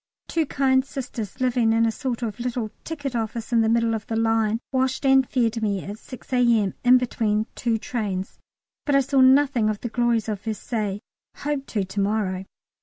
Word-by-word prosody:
Two 320 -3 0
kind 260 -1 +2
sisters, 255 -5 -6
living 245 -3 +2
in 230 0 +3
a 225 - +2
sort 250 0 -4
of 220 -2 -4
little 240 -3 -3
ticket 285 -5 -5
office 230 +1 -3
in 230 - +5
the 220 - +2
middle 230 0 +2
of 220 -1 -4
the 225 - -2
line, 225 -1 +1
washed 260 +1 0
and 265 -1 +4
fed 230 -2 0
me 200 -3 -1
at 205 +2 -7
6 255 0 -11
A.M. 235 -5 +3
in 250 +1 +7
between 220 -3 0
two 230 -2 0
trains, 210 -7 -4 0.5
but 285 - +3
I 275 - +6
saw 270 0 +2
nothing 260 -4 +4
of 210 -1 -2
the 240 - -3
glories 235 -1 +1
of 210 -3 -3
Versailles 215 -2 -3 0.3
hope 285 -1 -3
to 205 -3 -1
to 190 +2 -5
morrow. 195 -2 0
230 Hz, 190 wpm, -24 LUFS, 215-260 Hz, 0.5 s, in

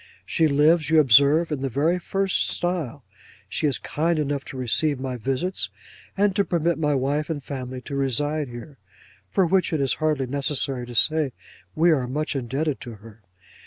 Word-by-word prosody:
She 160 -2 +2
lives, 150 +2 +3
you 160 -1 +5
observe, 145 +5 +5
in 145 -3 -2
the 135 - -1
very 155 +8 +1
first 195 +2 0
style. 160 -7 -2 0.4
She 155 - -1
is 140 - +1
kind 165 +2 -1
enough 145 -2 -1
to 135 - -8
receive 130 +3 +1
my 130 -1 -4
visits, 135 - -2 0.5
and 200 -1 +2
to 200 - +3
permit 170 -2 0
my 150 -2 +1
wife 140 +4 -1
and 145 -4 -4
family 130 -2 -6
to 140 - -9
reside 145 +3 0
here; 120 +3 -10 0.5
for 185 - +2
which 185 +2 +1
it 160 - 0
is 135 -3 +2
hardly 155 -4 +1
necessary 135 -2 -1
to 120 - -8
say, 155 +1 +2 0.4
we 165 +2 +4
are 135 -5 +1
much 150 +4 -3
indebted 135 +3 -2
to 120 -2 -8
her. 110 +1 -15
145 Hz, 180 wpm, -24 LUFS, 130-160 Hz, 0.5 s, you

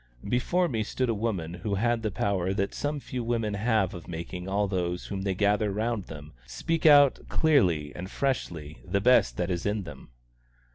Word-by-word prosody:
Before 175 +9 +1
me 115 -8 -1
stood 125 +3 -1
a - - +2
woman 100 -7 -2
who 100 +3 -3
had 120 +3 +1
the 110 - -1
power 95 -1 -1
that 100 0 -1
some 145 0 -2
few 125 -2 -5
women 115 -2 -1
have 105 -2 +1
of 85 -2 -9
making 90 +2 -6
all 100 +1 +1
those 90 -2 -2
whom 95 -1 -4
they 95 -1 -1
gather 105 +1 +2
round 110 0 -2
them 75 -1 -10
speak 165 -1 0
out 145 -2 +7
clearly 90 - +2
and 90 +2 -6
freshly 85 - -3
the 100 +1 0
best 125 +5 +4
that 90 +1 -1
is 85 -1 -2
in 105 0 -1
them. 75 -6 -11
100 Hz, 190 wpm, -27 LUFS, 90-120 Hz, -, out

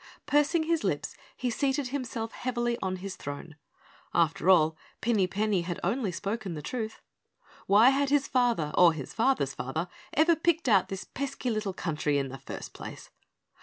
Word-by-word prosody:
Pursing 295 +3 +3
his 330 0 0
lips, - - -1 0.2
he 250 -2 -1
seated 270 +3 0
himself 240 -4 -3
heavily 240 -1 -1
on 185 -1 -1
his 185 +1 -6
throne. 145 +1 -7 0.6
After 170 +2 +2
all, 160 -4 +5 0.2
Pinny 220 -5 +2
Penny 205 0 0
had 175 0 -4
only 205 +2 0
spoken 200 0 -3
the 150 - -5
truth. 220 - -4 0.7
Why 215 +5 +7
had 275 0 +1
his 285 -1 +2
father 240 - +1
or 175 -2 +7
his 145 -5 -7
father's 225 - +1
father 140 +7 -3 0.3
ever 320 +3 +5
picked 330 -1 +1
out 200 -6 +4
this 195 +1 -4
pesky 265 -2 -3
little 215 -3 -2
country 150 -4 0
in 135 -1 -1
the 135 +1 -8
first 135 - -8
place? - - -9
215 Hz, 165 wpm, -29 LUFS, 175-265 Hz, 0.7 s, Why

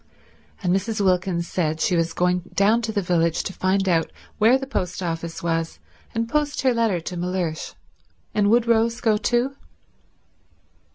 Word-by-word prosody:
And 180 0 +2
Mrs. 210 +3 -2
Wilkins 185 -3 +1
said 160 -3 -1
she 180 - +1
was 165 0 +1
going 180 +1 +1 0.2
down 215 +4 +4
to 225 -1 -2
the 205 -2 -1
village 170 -2 +1
to 190 - -5
find 190 +1 0
out 165 -3 +1 0.3
where 230 +5 +5
the 270 - -5
post 185 -8 -3
office 165 -1 -4
was 165 -1 -1 0.4
and 230 0 0
post 295 +3 -1
her 260 -2 +4
letter 225 -6 +1
to 180 +2 -6
Mellersh, 175 -2 -3 0.6
and 205 -1 +2
would 235 +1 +4
Rose 230 0 +2
go 220 -3 +2
too. 245 +5 0
190 Hz, 165 wpm, -23 LUFS, 170-230 Hz, 0.6 s, where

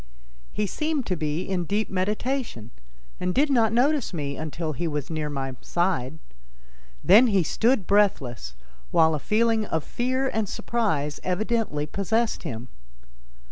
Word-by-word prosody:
He 210 - -1
seemed 305 - -2
to 185 - -1
be 155 +1 -2
in 185 -2 -2
deep 210 +4 0
meditation 205 - -2 0.5
and 180 0 -1
did 290 +1 +3
not 230 -4 +3
notice 255 - +2
me 140 -3 -3
until 155 +1 -4
he 170 +6 -2
was 150 -1 -3
near 155 -2 -2
my 135 -2 -4
side. 175 - -1 0.9
Then 230 +5 +7
he 200 -5 +3
stood 225 - +1
breathless, 135 - +1 0.3
while 160 -1 +4
a 150 - -1
feeling 225 +6 +2
of 160 -2 -1
fear 255 +2 -1
and 220 -5 -1
surprise 160 -12 -1
evidently 195 -5 -1
possessed 220 +8 -1
him. 125 -6 -6
185 Hz, 140 wpm, -25 LUFS, 150-230 Hz, 0.9 s, Then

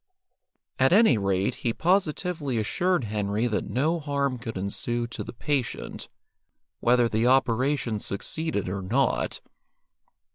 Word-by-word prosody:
At 130 +1 +4
any 195 - +5
rate, 95 -1 0
he 115 - 0
positively 170 -5 0
assured 175 - +1
Henry 105 +1 -1
that 115 -3 -1
no 155 +7 +1
harm 140 -3 -1
could 115 -3 -6
ensue 120 +5 -2
to 120 - -6
the - - -7
patient, 135 0 -3 0.7
whether 120 0 +4
the 115 +1 +1
operation 130 -2 +2
succeeded 105 - -2
or 95 +2 -3
not. 120 +9 0
125 Hz, 120 wpm, -26 LUFS, 110-145 Hz, 0.7 s, any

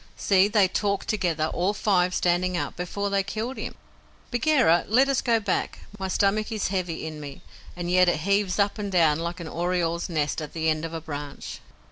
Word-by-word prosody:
See, 195 0 +4
they 205 -2 +4
talked 200 +1 -1
together, 170 -7 0
all 190 +4 0
five, 180 -4 +2
standing 180 +1 +1
up, - - -3
before 200 +3 -3
they 200 0 +2
killed 220 +6 -4
him. - - -5 0.6
Bagheera, 245 - +3
let 255 +6 +4
us 275 -1 +1
go 230 -2 +2
back. 205 -3 -2 0.2
My 190 - -2
stomach 205 +3 +1
is 215 -4 -1
heavy 180 -5 -2
in 155 -1 -6
me, 140 -2 -9 0.3
and 175 0 -3
yet 180 0 +5
it 155 - 0
heaves 200 0 +1
up 200 +1 +1
and 205 -1 -3
down 160 -4 +3
like 170 +2 -4
an 170 - -6
oriole's 170 0 -1
nest 155 -1 -1
at 150 - -7
the 160 -1 0
end 155 +1 -2
of 165 - -6
a 165 - -4
branch." 145 -2 -7
180 Hz, 200 wpm, -25 LUFS, 165-205 Hz, 0.6 s, yet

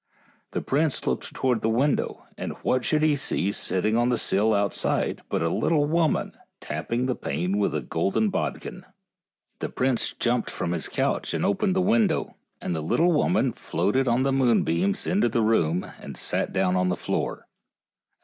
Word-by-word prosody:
The - - -2
prince 145 +1 0
looked - - -2
towards 125 -4 0
the 110 - +1
window, 130 +5 0
and - - -5
what 130 -1 +1
should 155 +3 +1
he 155 -1 +4
see 100 -7 0
sitting 105 +2 -1
on 120 +1 +2
the 120 - +2
sill 105 +2 +2
outside 100 -2 0
but - - 0
a 80 - +1
little 145 - +1
woman 160 0 0 0.2
tapping 115 +12 -3
the 130 - 0
pane 90 - -2
with 100 -7 0
a 75 - -2
golden 100 - 0
bodkin. - - -4 0.8
The - - -3
prince 130 -2 0
jumped 120 0 0
from 85 - -3
his 85 -2 -2
couch - - -1
and - - 0
opened 185 - +1
the 185 - +2
window, 210 -3 +1 0.2
and 90 - -3
the 80 - -2
little 165 - +2
woman 155 - +2
floated 130 +6 0
on 120 +2 +2
the 135 0 +1
moonbeams 130 - +2
into 180 -9 +2
the 115 0 +1
room 90 -6 +2
and - - -9
sat - - -1
down 95 -1 +1
on 90 0 +2
the 90 - +1
floor. - - -3
120 Hz, 180 wpm, -25 LUFS, 95-145 Hz, 0.8 s, he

